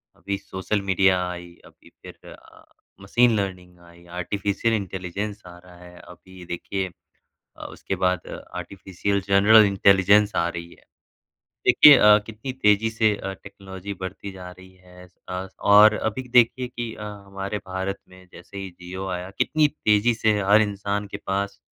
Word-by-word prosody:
अभी 100 Hz, 0 st, -4 dB
social 100 Hz, +1 st, -4 dB
media 95 Hz, -1 st, +2 dB
आई, 85 Hz, -1 st, -9 dB
अभी -, -, -20 dB
फ़िर -, -, -15 dB
अ, -, -, -19 dB, 0.4 s
मशीन 115 Hz, +4 st, +2 dB
लर्निंग 90 Hz, -2 st, -6 dB
आई, 85 Hz, 0 st, -19 dB
आर्टिफिशियल 100 Hz, +5 st, -2 dB
इंटेलिजेंस 100 Hz, +1 st, -4 dB
आ 90 Hz, 0 st, -12 dB
रहा 90 Hz, 0 st, -17 dB
है, 90 Hz, 0 st, -15 dB
अभी 90 Hz, +1 st, -14 dB
देखिए 95 Hz, +2 st, -4 dB, 0.7 s
अ, -, -, -9 dB
उसके 95 Hz, -, -6 dB
बाद 90 Hz, -1 st, -1 dB
अ, -, -, -8 dB
आर्टिफिशियल 100 Hz, +1 st, -3 dB
जनरल 105 Hz, +3 st, +6 dB
इंटेलिजेंस 100 Hz, +1 st, +4 dB
आ 85 Hz, -, +1 dB
रही 85 Hz, 0 st, -7 dB
है। -, -, -19 dB, 0.8 s
देखिए 150 Hz, -2 st, +8 dB
अ, 105 Hz, -2 st, +6 dB
कितनी 115 Hz, +4 st, -7 dB
तेज़ी 110 Hz, -3 st, +2 dB
से 110 Hz, -1 st, +1 dB
अ, 95 Hz, -, -6 dB
टेक्नोलॉजी 95 Hz, 0 st, -10 dB
बढ़ती 95 Hz, +2 st, -7 dB
जा 90 Hz, -1 st, -10 dB
रही 95 Hz, +1 st, -16 dB
है 90 Hz, 0 st, -17 dB
आस-पास 90 Hz, +1 st, -9 dB
और 105 Hz, +1 st, +7 dB
अभी 110 Hz, +4 st, -3 dB
देखिए 125 Hz, +1 st, +3 dB
कि 120 Hz, -2 st, -6 dB
अ, -, -, -11 dB
हमारे 100 Hz, 0 st, -6 dB
भारत 95 Hz, +1 st, -4 dB
में 95 Hz, 0 st, -17 dB
जैसे 90 Hz, +3 st, -14 dB
ही 95 Hz, -1 st, -5 dB
जियो 90 Hz, +2 st, -8 dB
आया 90 Hz, +1 st, -5 dB
कितनी 155 Hz, -1 st, +2 dB
तेज़ी 110 Hz, -5 st, +1 dB
से 110 Hz, -2 st, +1 dB
हर 100 Hz, +2 st, +4 dB
इंसान 100 Hz, 0 st, -3 dB
के 100 Hz, -, -7 dB
पास 100 Hz, +1 st, -3 dB
100 Hz, 160 wpm, -23 LUFS, 90-105 Hz, 0.8 s, देखिए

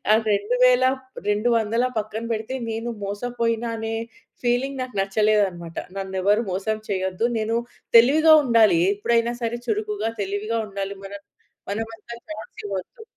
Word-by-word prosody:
ఆ -, -, +8 dB, 0.2 s
2000 245 Hz, +5 st, +3 dB, 0.5 s
200 230 Hz, +2 st, +2 dB
పక్కన 215 Hz, +2 st, -4 dB
పెడితే, 220 Hz, +4 st, -3 dB, 0.2 s
నేను 225 Hz, +2 st, -3 dB
మోసపోయిన 230 Hz, +3 st, -2 dB
అనే 225 Hz, 0 st, -3 dB, 0.5 s
ఫీలింగ్ 260 Hz, +3 st, 0 dB
నాకు 255 Hz, -2 st, -7 dB
నచ్చలేదన్నమాట. 195 Hz, -4 st, +1 dB, 0.2 s
నన్ను 190 Hz, 0 st, -4 dB
ఎవరు 205 Hz, +4 st, +3 dB
మోసం 200 Hz, +4 st, -1 dB
చేయొద్దు, 190 Hz, +2 st, 0 dB
నేను 220 Hz, +1 st, 0 dB, 0.4 s
తెలివిగా 310 Hz, +7 st, +6 dB
ఉండాలి, 220 Hz, -9 st, +5 dB
ఎప్పుడైనా 235 Hz, +3 st, +1 dB
సరే 235 Hz, +1 st, -1 dB
చురుకుగా 420 Hz, -, -1 dB
తెలివిగా 205 Hz, +4 st, -2 dB
ఉండాలి. 200 Hz, 0 st, -4 dB
మన 195 Hz, -, -8 dB, 0.6 s
మనమంతా 225 Hz, +2 st, -5 dB
చాన్స్ 210 Hz, +1 st, -8 dB
ఇవ్వోద్దు. 200 Hz, -, -6 dB
225 Hz, 125 wpm, -23 LUFS, 200-240 Hz, 0.6 s, ఆ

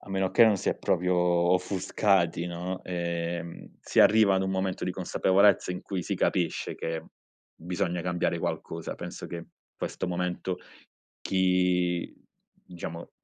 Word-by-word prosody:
a 100 Hz, -, -13 dB
meno 95 Hz, -1 st, 0 dB
che 115 Hz, -, +7 dB
non 110 Hz, -2 st, +4 dB
si -, -, -2 dB
è -, -, +1 dB
proprio 90 Hz, +1 st, +1 dB
offuscati, 90 Hz, 0 st, +2 dB
no, 90 Hz, +2 st, -4 dB
ehm, 85 Hz, -1 st, -4 dB
si -, -, -3 dB
arriva 105 Hz, -2 st, +6 dB
ad 95 Hz, -, +2 dB
un 95 Hz, -, -1 dB
momento 95 Hz, 0 st, -1 dB
di 90 Hz, -, -1 dB
consapevolezza, 95 Hz, +1 st, +3 dB
in 90 Hz, -, -6 dB
cui 95 Hz, -3 st, -3 dB
si -, -, -2 dB
capisce 85 Hz, -3 st, 0 dB
che 80 Hz, -1 st, -3 dB, 0.5 s
bisogna 90 Hz, +1 st, -2 dB
cambiare 90 Hz, 0 st, 0 dB
qualcosa. 80 Hz, 0 st, -4 dB
Penso -, -, -7 dB
che 85 Hz, -1 st, -6 dB, 0.3 s
questo -, -, -4 dB
momento 90 Hz, +1 st, -2 dB, 0.6 s
chi 90 Hz, -2 st, +1 dB, 0.5 s
diciamo, 85 Hz, -1 st, -7 dB
90 Hz, 140 wpm, -28 LUFS, 85-95 Hz, 0.6 s, che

